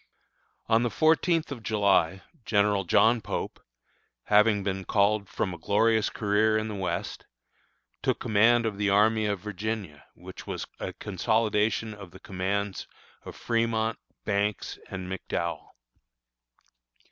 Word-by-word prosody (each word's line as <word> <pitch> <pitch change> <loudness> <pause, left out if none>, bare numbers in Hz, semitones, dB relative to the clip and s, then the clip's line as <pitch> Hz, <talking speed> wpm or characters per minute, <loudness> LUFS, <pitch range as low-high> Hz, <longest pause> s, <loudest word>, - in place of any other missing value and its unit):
On 115 0 +3
the 120 - +1
fourteenth 160 +2 +2
of 130 -4 -6
July, 100 -4 +2 0.2
General 100 -2 +2
John 115 +7 +4
Pope, 100 - -4 0.6
having 105 -1 +4
been 95 -1 -2
called 100 0 +1
from 95 - -2
a 85 - -9
glorious 110 +4 +2
career 110 +1 +2
in 110 0 -2
the - - -4
West, 95 -2 -4 0.7
took - - 0
command 115 +1 +3
of 105 -3 -3
the 105 -1 +1
Army 110 +2 +3
of 100 -3 -2
Virginia, 100 -6 -5
which - - -11
was - - -4
a - - -4
consolidation 110 +2 0
of 100 -3 -11
the 95 +2 -14
commands 95 +1 -3 0.4
of - - -8
Fremont, 115 -1 0 0.3
Banks, 100 -1 -1
and 95 -1 -6
McDowell. 85 -2 -4
105 Hz, 130 wpm, -27 LUFS, 100-110 Hz, 0.7 s, John